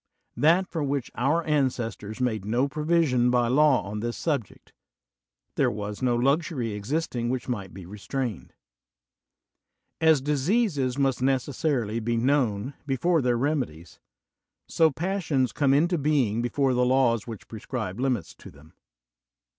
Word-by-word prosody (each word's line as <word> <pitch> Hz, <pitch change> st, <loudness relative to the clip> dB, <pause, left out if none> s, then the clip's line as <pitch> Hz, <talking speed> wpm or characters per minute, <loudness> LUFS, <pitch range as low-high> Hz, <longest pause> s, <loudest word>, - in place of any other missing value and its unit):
That 165 Hz, +8 st, +3 dB
for 160 Hz, -3 st, -3 dB
which 140 Hz, -2 st, -2 dB
our 145 Hz, +7 st, +1 dB
ancestors 125 Hz, -7 st, -1 dB
made 115 Hz, -6 st, -1 dB
no 120 Hz, +6 st, +1 dB
provision 150 Hz, -5 st, +2 dB
by 120 Hz, -1 st, +2 dB
law 140 Hz, -3 st, +4 dB
on 100 Hz, +3 st, -5 dB
this 120 Hz, +2 st, -3 dB
subject: 140 Hz, -, -3 dB, 0.8 s
there -, -, +3 dB
was 105 Hz, 0 st, -5 dB
no 125 Hz, -2 st, +2 dB
luxury 135 Hz, -1 st, 0 dB
existing 120 Hz, +3 st, -2 dB
which 125 Hz, -1 st, -3 dB
might 100 Hz, -7 st, -4 dB
be 95 Hz, -2 st, -10 dB
restrained. 105 Hz, +3 st, -5 dB, 1.5 s
As 160 Hz, -2 st, +5 dB
diseases 145 Hz, -, 0 dB
must 135 Hz, -3 st, +1 dB
necessarily 130 Hz, -3 st, 0 dB
be 115 Hz, +1 st, -1 dB
known 125 Hz, -2 st, +1 dB
before 155 Hz, +5 st, +1 dB
their 125 Hz, -2 st, +1 dB
remedies, 120 Hz, -, -3 dB, 0.7 s
so 160 Hz, -1 st, +3 dB
passions 155 Hz, -4 st, -1 dB
come 140 Hz, -2 st, +1 dB
into 165 Hz, +5 st, +2 dB
being 135 Hz, -7 st, +1 dB
be 120 Hz, -, -1 dB
fore 135 Hz, +1 st, +1 dB
the 125 Hz, 0 st, +2 dB
laws 125 Hz, -3 st, +2 dB
which 115 Hz, -4 st, -8 dB
prescribe 110 Hz, -2 st, -5 dB
limits 130 Hz, -2 st, -1 dB
to -, -, -13 dB
tiiem. 75 Hz, +2 st, -18 dB
130 Hz, 140 wpm, -26 LUFS, 115-145 Hz, 1.5 s, As